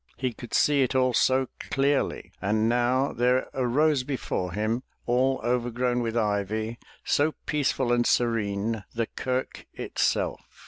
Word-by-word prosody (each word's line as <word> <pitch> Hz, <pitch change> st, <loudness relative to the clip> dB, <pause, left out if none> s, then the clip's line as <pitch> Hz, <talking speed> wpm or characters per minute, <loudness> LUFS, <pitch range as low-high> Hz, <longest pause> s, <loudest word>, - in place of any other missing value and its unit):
He 130 Hz, -1 st, -2 dB
could 120 Hz, +1 st, -6 dB
see 145 Hz, -2 st, +4 dB
it 130 Hz, 0 st, +1 dB
all 130 Hz, -1 st, +3 dB
so 130 Hz, +2 st, +3 dB
clearly. 140 Hz, +1 st, 0 dB
And 110 Hz, +3 st, +1 dB
now 125 Hz, +3 st, +2 dB
there 125 Hz, +2 st, +2 dB
rose 135 Hz, +3 st, +2 dB
before 125 Hz, -9 st, -3 dB
him, 110 Hz, +5 st, -1 dB, 0.2 s
all 130 Hz, +2 st, +2 dB
overgrown 120 Hz, 0 st, 0 dB
with 115 Hz, 0 st, -2 dB
ivy, 110 Hz, +1 st, -1 dB, 0.2 s
so 150 Hz, +2 st, +1 dB
peace 150 Hz, -2 st, +1 dB
ful 120 Hz, -2 st, 0 dB
and 120 Hz, 0 st, +2 dB
serene, 110 Hz, -2 st, 0 dB
the 115 Hz, 0 st, 0 dB
kirk 130 Hz, +3 st, -4 dB
itself. -, -, -1 dB
120 Hz, 140 wpm, -26 LUFS, 115-130 Hz, 0.2 s, see